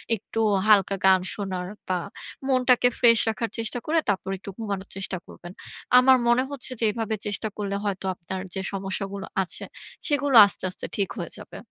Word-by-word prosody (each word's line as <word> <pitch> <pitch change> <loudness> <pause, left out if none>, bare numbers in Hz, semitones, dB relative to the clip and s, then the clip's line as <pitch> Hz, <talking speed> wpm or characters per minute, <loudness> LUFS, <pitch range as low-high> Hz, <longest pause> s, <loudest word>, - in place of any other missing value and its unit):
একটু 225 +2 -4 0.3
হালকা 200 -2 +5
গান 190 -1 +6
শোনার 190 -3 -4 0.2
বা, 185 -1 0 0.5
মনটাকে 250 -1 +4
ফ্রেশ 230 -2 +6
রাখার 225 +1 -2
চেষ্টা 230 +2 -2
করে, 325 +1 +2
তারপর 190 -1 -1
একটু 200 - -10
ঘুমানোর 200 -4 -4
চেষ্টা 190 0 -3
করবেন। 175 - -11 0.5
আমার 260 +1 +6
মনে 240 +2 +4
হচ্ছে 275 -2 -2
যে 225 - +1
এভাবে 220 0 -2
চেষ্টা 210 +2 -2
করলে 200 -1 -2
হয়তো 195 -2 -3
আপনার 185 +2 -6
যে 190 - -2
সমস্যাগুলো 195 0 -4 0.2
আছে, 180 - -5 0.4
সেগুলো 285 -3 +1
আস্তে, 200 - -5
আস্তে 180 - -6
ঠিক 200 -2 -1
হয়ে - - -5
যাবে। - - -11
205 Hz, 170 wpm, -25 LUFS, 190-240 Hz, 0.5 s, গান